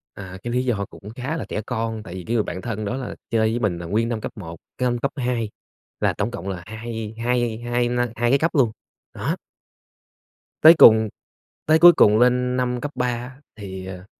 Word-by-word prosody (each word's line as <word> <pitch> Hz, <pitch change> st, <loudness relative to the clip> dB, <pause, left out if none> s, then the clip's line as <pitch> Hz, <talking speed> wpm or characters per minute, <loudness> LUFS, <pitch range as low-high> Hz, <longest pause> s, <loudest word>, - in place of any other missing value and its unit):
À, 95 Hz, -1 st, -8 dB
cái 120 Hz, 0 st, -3 dB
lý 125 Hz, -, +1 dB
do 105 Hz, -6 st, 0 dB
cũng 105 Hz, -, -12 dB
khá 135 Hz, +6 st, -3 dB
là -, -, -4 dB
trẻ 105 Hz, -, -2 dB
con, 115 Hz, -2 st, -3 dB
tại 90 Hz, -, -9 dB
vì 90 Hz, -, -6 dB
cái 115 Hz, -, -1 dB
người 110 Hz, -, +2 dB
bạn 95 Hz, -, -6 dB
thân 110 Hz, -3 st, -4 dB
đó 120 Hz, -, -2 dB
là 130 Hz, -, -6 dB
chơi 110 Hz, -1 st, +2 dB
với 120 Hz, -, -1 dB
mình 95 Hz, -7 st, 0 dB
là 85 Hz, -, -7 dB
nguyên 110 Hz, +6 st, 0 dB
năm 110 Hz, -2 st, -3 dB
cấp -, -, -5 dB
1, 85 Hz, -4 st, -8 dB, 0.2 s
cái 125 Hz, -, -1 dB
năm 120 Hz, -, -1 dB
cấp 140 Hz, +3 st, -2 dB
2 125 Hz, -5 st, -1 dB, 0.5 s
là -, -, +1 dB
tổng 105 Hz, +4 st, -2 dB
cộng 110 Hz, -5 st, -7 dB
là 90 Hz, -2 st, -5 dB
hai 110 Hz, 0 st, -6 dB
hai 120 Hz, -2 st, 0 dB
hai 120 Hz, 0 st, -1 dB
năm 120 Hz, 0 st, 0 dB
hai 120 Hz, 0 st, +1 dB
cái 140 Hz, -, +4 dB
cấp 165 Hz, +3 st, +1 dB
luôn, 120 Hz, -6 st, +3 dB, 0.4 s
đó. -, -, -2 dB, 1.3 s
Tới 160 Hz, +2 st, +10 dB
cùng 110 Hz, -4 st, +7 dB, 0.6 s
tới 155 Hz, +1 st, +4 dB
cuối 175 Hz, +1 st, +9 dB
cùng 105 Hz, -6 st, +5 dB
lên 125 Hz, +1 st, +2 dB
năm 125 Hz, -1 st, -1 dB
cấp 145 Hz, +1 st, -4 dB
3 125 Hz, 0 st, 0 dB
á 120 Hz, +1 st, -4 dB, 0.2 s
thì, 95 Hz, -3 st, -8 dB
à, 90 Hz, 0 st, -8 dB
120 Hz, 230 wpm, -22 LUFS, 105-125 Hz, 1.3 s, Tới